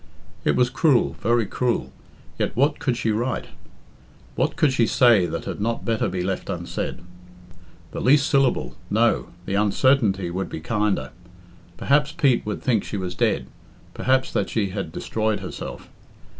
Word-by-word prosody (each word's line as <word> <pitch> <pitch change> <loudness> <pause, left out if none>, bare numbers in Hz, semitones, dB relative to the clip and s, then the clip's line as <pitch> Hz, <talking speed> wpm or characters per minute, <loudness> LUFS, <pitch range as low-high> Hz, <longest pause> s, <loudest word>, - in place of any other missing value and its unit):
It 75 - +2
was 125 -1 +2
cruel 130 -2 +2
very 120 0 +2
cruel 120 +4 -1 0.5
yet - - -1
what 145 +4 +2
could 125 -3 0
she 115 - 0
write? 120 +4 -2 0.8
What - - 0
could 145 -4 +2
she 120 -3 +3
say 115 -8 +5
that - - -5
had - - -5
not 115 +2 -2
better 115 -2 0
be 90 -1 -2
left 95 +1 -3
unsaid? 85 -1 -4 0.9
The - - -5
least 140 +2 +4
syllable 135 - +1
no, - - +2 0.2
the 95 - -3
uncertainty 100 -2 +2
would 95 +2 -3
be - - -5
kinder. 105 - -1 0.7
Perhaps 150 +2 +2
Pete 140 -7 +2
would 105 - -4
think 115 -6 +2
she 105 - -5
was 90 -2 -3
dead - - 0 0.5
perhaps 130 0 +1
that - - 0
she 105 -4 0
had 95 -4 -4
destroyed 110 +3 -2
herself. 90 - -7
115 Hz, 155 wpm, -23 LUFS, 95-130 Hz, 0.9 s, say